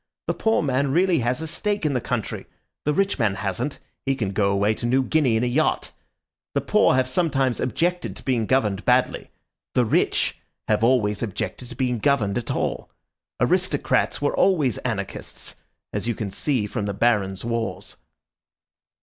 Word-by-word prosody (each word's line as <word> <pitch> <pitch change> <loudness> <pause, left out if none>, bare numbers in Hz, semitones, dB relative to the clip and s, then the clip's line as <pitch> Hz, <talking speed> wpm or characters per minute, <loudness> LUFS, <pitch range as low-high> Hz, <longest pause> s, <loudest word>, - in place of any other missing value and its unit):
The - - 0
poor 220 -5 +1
man 135 0 +1
really 175 +1 +3
has 125 +5 -1
a - - -4
stake 205 +3 -1
in 150 - +2
the 125 - 0
country. - - -3 0.4
The 150 - +2
rich 195 -2 +1
man 105 -4 +2
hasn't; 110 +8 -3 0.3
he 135 0 +1
can 105 -7 -2
go 100 0 +2
away 100 +2 +2
to 120 - -3
New 130 +2 +3
Guinea 135 -4 +2
in 110 - +1
a - - +2
yacht. 140 +6 +1 0.6
The - - +2
poor - - +3
have 130 -1 +2
sometimes 135 -4 +1
objected 175 - -1
to - - -12
being 120 -5 0
governed 105 -7 +1
badly; 125 0 +2 0.5
the 125 - +4
rich 110 - +1 0.3
have 105 0 +2
always 110 -4 +2
objected 115 +3 -4
to - - -8
being 125 -3 0
governed 110 -3 +2
at 120 - -8
all. - - -2 0.5
Aristocrats - - +1
were 145 - 0
always 150 - +2
anarchists, 105 -6 -5 0.4
as 105 +2 -2
you 120 - 0
can 100 -2 -4
see 125 +1 0
from 105 0 -3
the 100 - -3
barons' 100 -3 +1
wars." 115 -1 -3
125 Hz, 175 wpm, -24 LUFS, 105-140 Hz, 0.6 s, the